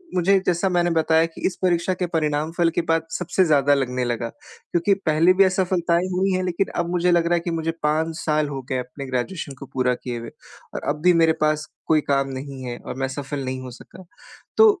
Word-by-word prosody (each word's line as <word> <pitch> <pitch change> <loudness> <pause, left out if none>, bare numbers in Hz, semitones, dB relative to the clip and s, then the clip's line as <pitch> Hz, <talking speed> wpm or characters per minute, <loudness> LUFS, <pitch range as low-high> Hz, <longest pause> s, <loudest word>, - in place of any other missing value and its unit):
मुझे 190 +2 +4
जैसा 175 +2 +1
मैंने 175 -1 +2
बताया 160 0 +3
कि 165 - -10
इस 180 - -3
परीक्षा 180 0 +1
के 180 0 -2
परिणाम 155 -2 -1
फल 170 -2 +4
के 175 - +2
बाद 165 0 +1
सबसे 180 +1 +1
ज़्यादा 145 -3 +4
लगने 130 -2 0
लगा 120 -1 -2
क्योंकि 175 - -2
पहले 160 +3 +4
भी 195 +1 +5
असफलताएँ 180 -2 +1
हुई 190 +2 +1
हैं 185 0 0
लेकिन 180 +2 0
अब 170 - -4
मुझे 180 0 +2
लग 170 -1 +3
रहा 170 - +1
है 175 - +3
कि 170 +1 -4
मुझे 165 0 -1
5 160 +2 +1
साल 155 -2 0
हो 135 -2 -5
गए 130 - 0
अपने 125 +3 -7
ग्रेजुएशन 135 +4 -3
को - - -7
पूरा 125 -1 +2
किए 120 -1 -5
हुए 115 0 -7 0.4
और - - -4
अब 150 +1 -2
भी 180 0 +6
मेरे 165 -1 +4
पास 155 0 +1 0.2
कोई 155 -1 +4
काम 140 -1 +1
नहीं 135 0 -7
है 120 -1 -5
और - - -8
मैं 135 - 0
सफल 140 +1 -5
नहीं 130 0 -3
हो 130 -1 -8
सका। 185 +9 -13 0.5
तो 445 - +8
160 Hz, 225 wpm, -23 LUFS, 140-175 Hz, 0.5 s, तो